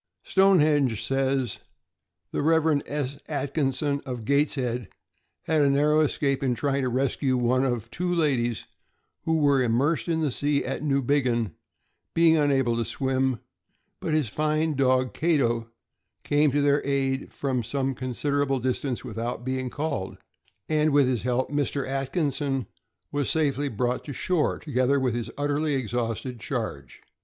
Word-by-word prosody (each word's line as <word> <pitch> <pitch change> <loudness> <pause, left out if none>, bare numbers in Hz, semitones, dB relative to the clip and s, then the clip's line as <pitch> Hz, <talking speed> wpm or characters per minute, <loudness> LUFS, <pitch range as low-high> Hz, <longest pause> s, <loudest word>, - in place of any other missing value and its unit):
Stonehenge 150 - +3
says: 135 -3 0 0.7
The - - -1
Rev. 160 -1 +3
S. 140 -1 -3
Atkinson, 140 0 -1
of 125 -5 -6
Gateshead, 130 -4 0 0.5
had 160 -1 +2
a 140 - +4
narrow 150 +2 +3
escape 140 -2 +1
in 130 -3 +1
trying 140 +1 0
to 130 - 0
rescue 130 +1 0
one 125 +2 +2
of 120 -4 -2
two 180 +1 -2
ladies 130 -9 0 0.6
who 160 0 +2
were 140 -3 +3
immersed 125 +4 +1
in 165 -1 0
the 150 -3 +1
sea 145 +2 0
at 135 - -3
Newbiggin, 135 - +1 0.6
being 165 -1 +5
himself 155 -2 +3
unable 135 -4 +2
to 115 - +1
swim; 130 +1 -1 0.6
but 155 - -1
his 155 -5 +1
fine 155 +6 0
dog 130 -2 +2
Cato 120 -8 +1 0.5
came 145 +1 +3
to 145 +2 +1
their 145 0 +3
aid 135 -1 -1
from 130 -3 -1
some 135 +3 -1
con 130 0 -5
siderable 140 0 0
distance 130 +1 -2
without 120 +1 -4
being 130 -1 -2
called, 145 -9 -3 0.5
and 155 0 +2
with 145 -2 +4
his 125 -4 0
help 125 +3 -1
Mr. 145 -1 -1
Atkinson 135 0 -1 0.5
was 145 -2 -1
safely 145 -2 +1
brought 125 +2 -1
to 145 - -5
shore, 175 +2 0
together 140 -1 +1
with 130 -3 0
his 120 -1 -3
utterly 145 +1 0
exhausted 120 0 -3
charge. 110 - -5
135 Hz, 150 wpm, -26 LUFS, 125-145 Hz, 0.7 s, being